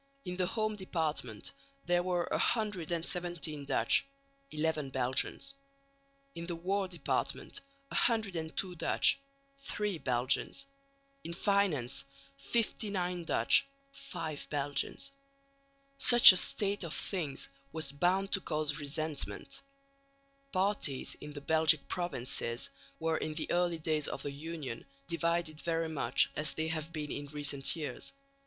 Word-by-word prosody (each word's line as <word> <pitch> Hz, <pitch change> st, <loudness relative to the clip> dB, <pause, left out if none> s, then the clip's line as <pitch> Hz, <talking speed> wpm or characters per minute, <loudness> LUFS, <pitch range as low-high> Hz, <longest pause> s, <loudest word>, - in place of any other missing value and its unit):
In 180 Hz, -, -3 dB
the 180 Hz, -1 st, +1 dB
home 215 Hz, +1 st, -1 dB
department 155 Hz, -, -2 dB, 0.3 s
there 175 Hz, 0 st, +3 dB
were 175 Hz, -1 st, 0 dB
117 175 Hz, -7 st, -1 dB
Dutch, -, -, +3 dB, 0.5 s
11 155 Hz, -2 st, -1 dB
Belgians; 130 Hz, -, -1 dB, 0.8 s
in 170 Hz, 0 st, -6 dB
the 175 Hz, -, -2 dB
war 190 Hz, +3 st, -1 dB
department 175 Hz, -2 st, -2 dB, 0.3 s
102 190 Hz, -6 st, 0 dB
Dutch, -, -, +3 dB, 0.4 s
3 210 Hz, -9 st, -2 dB
Belgians; 130 Hz, -, 0 dB, 0.6 s
in 170 Hz, -, -5 dB
finance 190 Hz, -11 st, +2 dB, 0.4 s
59 180 Hz, 0 st, -1 dB
Dutch, 275 Hz, -, +4 dB, 0.2 s
5 160 Hz, -, -5 dB
Belgians. 145 Hz, -, -1 dB, 0.9 s
Such 240 Hz, -4 st, +11 dB
a 185 Hz, -, +3 dB
state 200 Hz, +1 st, +1 dB
of 165 Hz, -, -4 dB
things 155 Hz, -8 st, -3 dB, 0.2 s
was 160 Hz, -2 st, -3 dB
bound 185 Hz, +7 st, +1 dB
to 195 Hz, -, +2 dB
cause 150 Hz, -2 st, 0 dB
resentment. 150 Hz, +1 st, -2 dB, 0.9 s
Parties 185 Hz, -8 st, +1 dB
in 150 Hz, 0 st, -8 dB
the 145 Hz, -, -7 dB
Belgic 160 Hz, 0 st, +4 dB
provinces 125 Hz, -8 st, -1 dB, 0.3 s
were 160 Hz, 0 st, 0 dB
in 155 Hz, -, -3 dB
the 155 Hz, -, -3 dB
early 175 Hz, -1 st, +2 dB
days 155 Hz, -2 st, 0 dB
of 135 Hz, -, -5 dB
the 145 Hz, -, -3 dB
Union 145 Hz, -4 st, -6 dB, 0.2 s
divided 170 Hz, -1 st, 0 dB
very 165 Hz, -1 st, -1 dB
much 155 Hz, -3 st, +2 dB
as 150 Hz, -1 st, +1 dB
they 160 Hz, 0 st, -1 dB
have 160 Hz, 0 st, -3 dB
been 150 Hz, -3 st, -4 dB
in 145 Hz, 0 st, -4 dB
recent 145 Hz, -1 st, 0 dB
years. 155 Hz, -3 st, -4 dB
165 Hz, 120 wpm, -32 LUFS, 150-185 Hz, 0.9 s, Such